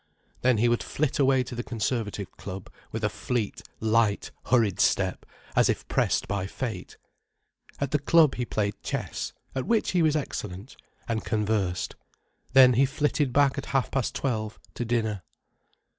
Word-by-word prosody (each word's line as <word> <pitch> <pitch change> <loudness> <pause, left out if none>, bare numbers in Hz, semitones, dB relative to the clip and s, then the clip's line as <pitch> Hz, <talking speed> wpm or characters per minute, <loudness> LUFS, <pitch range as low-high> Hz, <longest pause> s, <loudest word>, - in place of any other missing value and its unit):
Then 125 -2 +4
he 115 +3 +3
would 120 0 +2
flit 150 -1 -1
away 135 -2 +4
to 125 - -8
the 120 - -3
Conservative 110 -3 -2
Club, 95 -1 -8 0.2
with 110 0 -4
a - - +4
fleet, 115 0 -2 0.2
light, 110 -2 +2 0.2
hurried 115 -5 +3
step, - - +1 0.3
as - - +4
if - - -1
pressed - - +1
by 100 -2 -2
fate. 120 +2 -5 0.8
At 140 -2 -1
the 150 - +2
club 155 0 +5
he 125 - -2
played 105 -3 -2
chess—at 130 -1 -4
which 230 -2 +2
he 180 - +2
was 155 -2 +3
excellent—and 110 -2 -5
conversed. 105 -4 -1 0.6
Then 130 -1 +8
he 130 +4 +4
flitted 145 0 0
back 140 +1 +3
at 140 - -7
half 130 - -1
past 135 -4 -1
twelve, 110 -5 -2 0.2
to 120 - -3
dinner. 110 -4 0
120 Hz, 155 wpm, -27 LUFS, 105-135 Hz, 0.8 s, Then